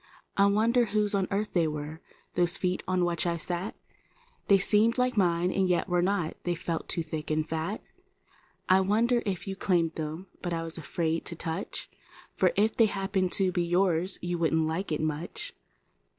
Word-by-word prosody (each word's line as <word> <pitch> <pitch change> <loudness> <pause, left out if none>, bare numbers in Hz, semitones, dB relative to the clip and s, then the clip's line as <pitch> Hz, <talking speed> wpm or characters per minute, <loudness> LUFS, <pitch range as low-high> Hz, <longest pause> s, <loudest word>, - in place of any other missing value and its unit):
I 200 0 +5
wondered 230 +4 +3
whose 210 -1 +1
on 195 -2 +1
earth 205 +1 -2
they 170 -3 +2
were— 150 +1 -5 0.3
those 175 -1 +2
feet 180 -1 -1
on 185 -1 +1
which 175 0 -1
I 170 0 0
sat; 175 +4 -3 0.7
They 200 - +6
seemed 210 +4 +5
like 250 0 +1
mine 180 -2 +2
and 190 -1 +1
yet 180 +2 +1
were 175 -1 +1
not; 180 -3 0
they 175 -1 -1
felt 165 0 -4
too 170 - -1
thick 155 -1 -5
and 155 0 0
fat. 160 +7 -3 0.8
I 190 0 +5
wondered 230 +5 +2
if 190 0 -3
you 195 - -3
claimed 175 -4 +1 0.5
was 165 -2 -3
afraid 165 +1 -2
to 170 - -4
touch. 165 +3 -4 0.5
For - - +3
if 215 +2 +2
they 225 - +5
happened 195 -2 -1
to 190 -2 +3
be 175 -1 0
wouldn't 175 -3 +1
like 165 +4 -3
it 155 - -1
much. 155 +2 -4
180 Hz, 170 wpm, -28 LUFS, 165-200 Hz, 0.8 s, They